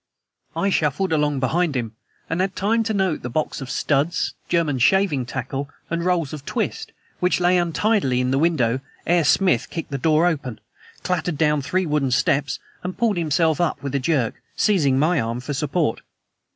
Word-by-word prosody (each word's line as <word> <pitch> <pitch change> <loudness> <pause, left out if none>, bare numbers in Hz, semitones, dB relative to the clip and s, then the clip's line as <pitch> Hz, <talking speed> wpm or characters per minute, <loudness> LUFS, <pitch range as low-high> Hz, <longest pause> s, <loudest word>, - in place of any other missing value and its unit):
I 200 - +1
shuffled 160 +3 +1
along 150 -3 +1
behind 160 +3 +1
him, 115 -3 -3 0.3
and 165 +3 -1
had 190 0 -1
time 220 +4 +1
to 220 - -1
note 190 -5 0
the 125 - -5
box 155 +3 -2
of 135 - -6
studs, 145 +4 0 0.2
German 160 -6 +1
shaving 150 -3 +2
tackle 135 +2 -4 0.2
and 170 0 -1
rolls 170 -5 0
of 150 -3 -7
twist - - -3 0.3
which 180 0 +2
lay 180 +1 +3
untidily 175 - +1
in 125 0 0
the 135 - +2
window 135 -7 +2 0.3
ere 175 0 +3
Smith 165 -4 +2
kicked 165 -3 -6
the 140 - -2
door 155 +4 +3
open, 135 -10 -2 0.4
clattered 175 -3 -1
down 150 -1 +2
three 185 +7 0
wooden 150 -4 0
steps, 135 +3 +1 0.2
and 180 +1 -5
pulled 225 -5 +1
himself 160 0 +1
up 155 -5 -1
with 140 -1 -4
a 140 - +1
jerk, 130 -4 0
seizing 150 -11 +2
my 160 +5 +2
arm 115 +1 -3
for 130 +4 -5
support. 150 -1 -1
155 Hz, 180 wpm, -22 LUFS, 135-175 Hz, 0.4 s, lay